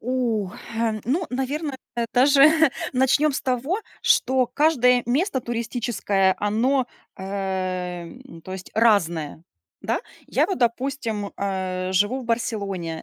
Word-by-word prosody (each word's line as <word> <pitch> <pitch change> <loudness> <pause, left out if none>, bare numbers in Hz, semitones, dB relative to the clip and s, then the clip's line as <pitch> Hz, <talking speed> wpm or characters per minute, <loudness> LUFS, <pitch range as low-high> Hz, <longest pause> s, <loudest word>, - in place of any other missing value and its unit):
У, 235 -5 -1 0.3
э, 225 -1 0
ну, 305 - 0
наверное, 270 +2 -2 0.4
даже 275 +3 +6 0.4
начнём 265 +4 +3
с - - -2
того, 265 - -1 0.2
что 255 0 +3
каждое 250 -2 +3
место 275 +4 +1
туристическое, 225 -5 0
оно, 240 +6 +1 0.3
э, - - -9 0.8
м, 165 0 -13
то 185 - -8
есть, 190 -1 -8
разное, 170 -9 +2 0.4
да. - - -1 0.3
Я - - +2
вот, 385 - -3
допустим, 235 -4 -1
э, 185 -1 -2
живу 205 +8 +2
в - - -8
Барселоне. 200 -8 -2
235 Hz, 120 wpm, -23 LUFS, 200-265 Hz, 0.8 s, даже